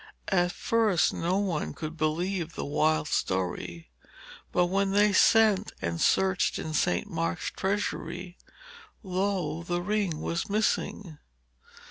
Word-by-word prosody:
At 175 -2 +2
first 215 -8 +2
no 175 +3 0
one 185 -6 -2
could 155 0 -6
believe 165 +2 -1
the - - -4
wild 155 +2 +1
story, 90 - -2 0.6
but 180 - +3
when 195 +2 0
they 205 0 +4
sent 215 -1 +4
and 85 0 -3
searched 190 0 +2
in 155 - -5
St. 180 +6 +1
Mark's 165 -2 -2
treasury, 190 -2 -3 0.7
lo! 190 -3 -1
the 175 +1 -2
ring 200 -5 -1
was 170 +4 -3
missing. 205 -5 -1
180 Hz, 120 wpm, -28 LUFS, 160-200 Hz, 0.7 s, they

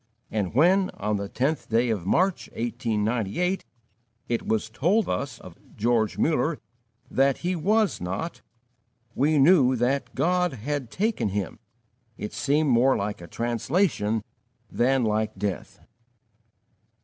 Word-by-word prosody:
And 105 -2 -2
when, 185 +7 +4
on 105 +1 -1
the 100 0 -5
tenth 135 +4 -1
day 115 +1 +2
of 95 -5 -3
March, 185 - +1
1898, 115 - -1 0.7
it 120 -1 -1
was 110 0 0
told 170 - +1
us 90 - -3
of - - -13 0.2
George 115 -1 +1
Muller 155 0 +1 0.5
that 135 0 +3
"he 180 +1 +1
was 210 - +1
not," 95 - -4 0.7
we 150 +5 +2
knew 140 -3 +5
that 125 +4 -1
"God 180 -1 +1
had 135 +1 -4
taken 195 - 0
him": 100 -2 -3 0.6
it 105 - -6
seemed 145 0 +1
more 125 +3 +4
like 105 -2 -3
a 85 - -9
translation 115 - 0 0.5
than 130 +1 +2
like 110 0 0
death. 100 -3 -4
125 Hz, 125 wpm, -26 LUFS, 110-155 Hz, 0.7 s, knew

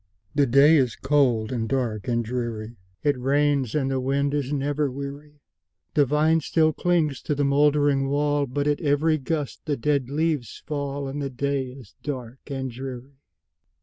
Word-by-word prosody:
The 140 -1 +3
day 140 +6 +6
is 125 -5 +1
cold, 130 -6 +2
and 115 -3 -2
dark, 115 -6 -1
and 120 -1 0
dreary; 115 -1 -4 0.3
It 145 -3 +1
rains, 140 -1 +1
and 135 -3 +1
the 135 - 0
wind 140 +2 0
is 145 -2 -1
never 145 0 0
weary; 140 +2 -7 0.6
The 145 -2 +3
vine 155 +3 +3
still 155 +1 +2
clings 165 -6 +1
to 150 - -1
the 145 0 +1
moldering 145 -1 +3
wall, 145 0 +1
But 140 +3 -2
at 145 +2 +1
every 155 +1 +2
gust 145 0 -3
the 145 -3 -1
dead 140 0 0
leaves 150 -5 -1
fall, 140 -2 -3
And 140 +2 -4
the 140 - -2
day 135 +1 -1
is 125 -4 -12
dark 130 -3 -5
and 135 -2 -4
dreary. 130 +2 -8
140 Hz, 170 wpm, -25 LUFS, 130-145 Hz, 0.6 s, day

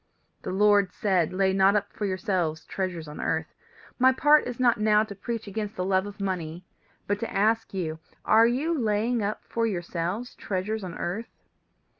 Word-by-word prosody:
"The - - -5
Lord 200 0 +4
said, 185 -6 +1
Lay 190 0 +2
not 195 +1 +4
up 210 - -1
for 205 - -2
yourselves 180 -4 -1
treasures 180 -5 -4
on 150 - -7
earth. 160 0 -2 0.5
My 260 +1 +6
part 295 +3 +4
is 245 0 -6
not 240 -4 +3
now 210 0 +4
to 215 -2 -7
preach 225 +3 -5
against 210 +1 -4
the 180 - -2
love 190 +1 +1
of 205 +1 -10
money, 180 -3 -3 0.4
but 205 0 -1
to 230 - -4
ask 220 +3 +1
you: 160 -5 -3 0.3
Are 225 +1 +6
you 275 +8 0
laying 225 -1 0
up 205 +1 -3
for 230 0 -1
yourselves 180 +4 -3
treasures 205 +2 -3
on 175 -3 -6
earth? 210 +7 -4
200 Hz, 180 wpm, -26 LUFS, 185-220 Hz, 0.5 s, My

